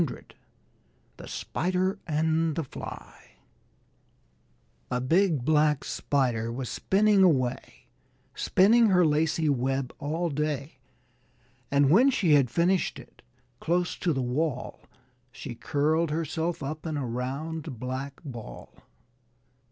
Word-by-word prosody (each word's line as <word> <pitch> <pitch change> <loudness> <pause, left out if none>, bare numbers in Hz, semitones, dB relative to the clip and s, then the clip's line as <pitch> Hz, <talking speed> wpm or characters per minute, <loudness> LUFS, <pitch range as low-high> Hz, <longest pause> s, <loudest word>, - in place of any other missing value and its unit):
] - - -39
THE - - -10
SPIDER 185 +3 -1
AND 160 0 +1
THE 165 - -1
FLY 135 - -9 1.8
A 125 - -1
big 160 0 +2
Black 150 -1 +3
Spider 120 -5 -1
was 125 +1 -4
spinning 205 0 +2
away, 130 -8 +1 0.5
Spinning 225 +5 +4
her 180 -3 +4
lacey 160 +2 +1
web 135 -1 0
all 160 +4 -2
day; 145 -1 -3 0.9
And 140 0 +3
when 240 - +6
she 185 - +2
had 140 -4 +4
finished 175 +8 +1
it, - - -15 0.4
close 175 +1 0
to 175 - 0
the 135 -4 -1
wall 130 +1 -2 0.5
She 125 0 -7
curled 155 +6 0
herself 160 +1 -2
up 155 +4 -5
in 155 -2 -2
a 140 - -2
round 135 +5 -4
black 130 +2 -5
ball. 120 -6 -9
150 Hz, 115 wpm, -27 LUFS, 135-170 Hz, 1.8 s, when